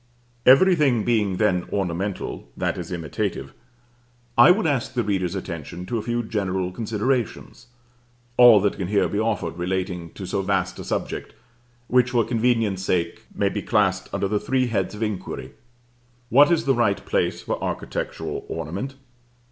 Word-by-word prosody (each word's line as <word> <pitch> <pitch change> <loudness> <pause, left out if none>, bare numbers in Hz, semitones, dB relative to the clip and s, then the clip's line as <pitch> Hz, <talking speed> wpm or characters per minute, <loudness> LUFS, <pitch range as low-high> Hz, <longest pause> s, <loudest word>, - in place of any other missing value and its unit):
Every 180 +9 +7
thing 135 -9 +2
being 105 -6 +1
then 95 -4 +1
ornamental 95 -6 -3
that - - -1
is 85 0 -6
imitative, 85 -5 -3 0.8
I - - +8
would 180 +2 +4
ask 135 -3 -1
the 120 - +1
reader's 95 -3 -1
attention 85 -1 -6
to 115 +4 -2
a - - -3
few 120 +2 -2
general 95 -4 -2
considerations, 115 +3 -2 0.7
all 120 -4 +8
that 100 - 0
can 95 -3 -3
here 100 +1 +2
be 100 - -2
offered 105 -7 -1
relating 90 -1 -2
to 95 - -7
so 95 +2 -1
vast 95 -1 -1
a - - -5
subject; - - -4 0.5
which, 125 0 +3
for 120 -3 +2
convenience 115 -5 +1
sake, 90 -3 -1
may - - +1
be - - -3
classed - - +1
under 100 - -1
the 105 +1 0
three 130 +2 +1
heads 105 -4 -1
of 110 - -3
inquiry: 105 -4 -4 0.8
What 145 +5 +6
is 170 -2 +2
the 135 - +4
right 115 -5 +1
place - - 0
for - - -3
architectural - - -4
ornament? 95 - -4
105 Hz, 160 wpm, -23 LUFS, 95-120 Hz, 0.8 s, I